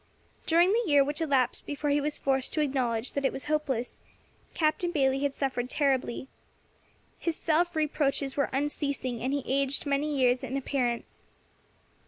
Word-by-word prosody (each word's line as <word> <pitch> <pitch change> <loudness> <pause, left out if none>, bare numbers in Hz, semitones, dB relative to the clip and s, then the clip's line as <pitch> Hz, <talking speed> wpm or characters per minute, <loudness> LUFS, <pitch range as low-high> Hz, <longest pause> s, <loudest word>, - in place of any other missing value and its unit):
During 345 +4 +5
the 465 - +3
year 290 -3 +5
which 295 +4 -3
elapsed 270 -6 +1
before 290 0 -1
he 290 +1 +2
was 295 +1 -2
forced 265 -1 0
to 310 - +1
acknowledge 255 -5 0
that 280 - -2
it 270 - +2
was 270 - -5
hopeless, 290 -6 -2 0.5
Captain 315 +2 +1
Bayley 270 -5 +2
had 280 0 -1
suffered 250 -3 -2
terribly. 265 -3 0 0.9
His 335 -2 -1
self 340 +2 +1
reproaches 285 -3 0
were 280 - +1
unceasing, 280 -3 -2
and 260 - -1
he 285 -1 -1
aged 275 +2 0
many 285 +1 0
years 255 -3 +2
in 265 +1 -3
appearance. 250 -3 -2
280 Hz, 160 wpm, -28 LUFS, 265-300 Hz, 0.9 s, During